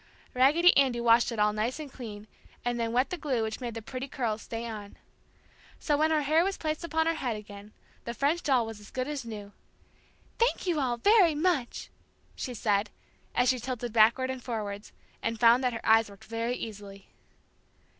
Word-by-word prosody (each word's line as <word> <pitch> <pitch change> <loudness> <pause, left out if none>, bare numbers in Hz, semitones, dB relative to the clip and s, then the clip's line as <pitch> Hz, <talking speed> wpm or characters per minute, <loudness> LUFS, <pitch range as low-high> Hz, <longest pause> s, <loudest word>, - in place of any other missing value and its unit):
Raggedy 300 +8 +5
Andy 260 -4 +3
washed 235 +1 +4
it 230 - -5
all 210 0 +3
nice 220 +7 -2
and 295 -3 -8
clean, 215 -5 -8 0.4
and 240 0 -1
then 230 -1 -1
wet 255 +8 +1
the 360 - -2
glue 260 -7 -1
which 220 +3 -4
made 240 -2 -4
the 225 - -6
pretty 260 +4 -5
curls 225 -5 -2
stay 230 0 -6
on. 210 -3 -8 0.8
So 295 - 0
when 310 +2 +2
her 310 -2 +2
hair 310 +4 +3
was 390 +1 -2
placed 310 +1 -3
upon 320 -1 0
her 330 - +2
head 250 -8 -2
again, 205 0 -10 0.3
the 235 - -4
French 300 +7 +1
doll 260 -6 +2
was 225 -1 -8
as 210 - -14
good 255 0 -3
as 290 -4 -4
new. 210 -3 -8 0.9
"Thank 470 -3 +1
you 345 -4 +1
all 250 -3 0
very 370 - +5
much!" 300 -6 -1 0.4
she 250 - -5
said, 205 -1 +1 0.5
as 250 0 +3
she 255 - +2
tilted 240 -1 -4
backwards 235 +4 +4
and 260 -1 -6
forwards, 210 -4 -5 0.3
and 225 -1 -2
found 235 +3 +5
that 250 -1 +1
her 225 - -6
eyes 225 -1 +5
worked 200 -1 -15
very 230 +2 -2
easily. 200 -4 -9
240 Hz, 195 wpm, -29 LUFS, 220-280 Hz, 0.9 s, Raggedy